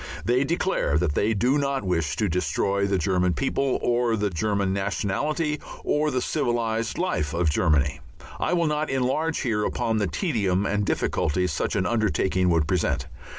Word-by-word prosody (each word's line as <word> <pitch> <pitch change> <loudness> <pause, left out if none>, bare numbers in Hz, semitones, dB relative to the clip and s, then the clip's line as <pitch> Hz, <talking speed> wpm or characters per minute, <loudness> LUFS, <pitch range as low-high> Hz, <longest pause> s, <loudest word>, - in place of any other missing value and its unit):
They 125 +3 +3
declare 170 - 0
that 80 -2 0
they 110 +8 +1
do 125 +8 +2
not 140 -3 -1
wish 85 -5 0
to 105 - 0
destroy 100 +3 0
the 100 -1 +1
German 90 0 +1
people 135 -1 0
or 120 -1 +2
the 105 -2 -1
German 100 +2 0
nationality 140 - -1 0.2
or 150 +1 +1
the 130 -3 -1
civilized 115 -1 -1
life 85 - -1
of 85 -2 +2
Germany. 75 -3 +1 0.4
I - - 0
will 170 -1 +2
not 150 0 0
enlarge 135 +5 0
here 110 -5 0
upon 115 0 0
the 100 - +1
tedium 100 - 0
and 105 -1 0
difficulties 90 +3 0
such - - -1
an 95 - +1
undertaking 95 -4 +1
would 80 -3 +2
present. 90 0 0
105 Hz, 165 wpm, -25 LUFS, 90-130 Hz, 0.4 s, They